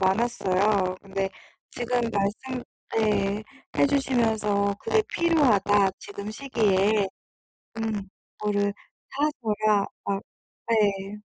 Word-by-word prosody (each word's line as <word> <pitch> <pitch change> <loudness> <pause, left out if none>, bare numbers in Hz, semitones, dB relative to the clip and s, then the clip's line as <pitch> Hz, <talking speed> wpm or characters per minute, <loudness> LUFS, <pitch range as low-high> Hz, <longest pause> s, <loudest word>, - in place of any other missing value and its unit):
많았어요. 190 -2 +2
근데 195 0 -2 0.4
지금 245 0 -1
말씀 220 +6 -1 0.4
예 210 -1 +1 0.3
해 - - +5
주시면서 220 -7 +1
"그게 440 -1 +2
필요하다 210 - +3
지금 205 +1 -7
시기에." 215 -5 +2 0.7
음 215 -3 -2 0.3
"그거를 205 -1 +1 0.4
다 270 - -9 0.2
줘야" 215 -2 +2 0.3
아 - - -9 0.5
네. 205 -2 +1
210 Hz, 190 characters per minute, -26 LUFS, 200-230 Hz, 0.7 s, 해